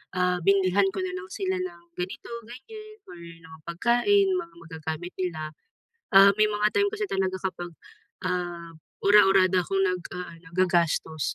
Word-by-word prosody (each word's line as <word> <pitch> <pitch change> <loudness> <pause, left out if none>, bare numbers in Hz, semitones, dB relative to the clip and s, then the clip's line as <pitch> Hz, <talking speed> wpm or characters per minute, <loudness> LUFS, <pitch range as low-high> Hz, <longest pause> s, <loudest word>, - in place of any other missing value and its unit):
ah, 180 0 +1
binilhan 195 +1 +3
ko - - -5
na 370 0 -4
lang 375 0 -7
sila 380 -1 -2
ng 170 - -8
ganito, 180 +6 -6 0.2
ganyan, 430 - -11
or 175 - -11
mga 165 -1 -13
pagkain, 240 - +2
mga 340 -2 -5
magagamit 160 +1 -6
nila, 160 -4 -3 0.6
ah, 195 +1 +9
may 215 - +5
mga 210 0 +1
time 405 0 +3
kasi 425 0 -3
talaga 190 -1 -1
kapag 175 -2 -4 0.6
ah, 175 -2 -3 0.3
ura-urada 195 -2 +5
akong 195 +2 -1
naga-aano, 180 -2 -4
naggagastos, 170 -4 0
185 Hz, 145 wpm, -26 LUFS, 170-235 Hz, 0.6 s, ah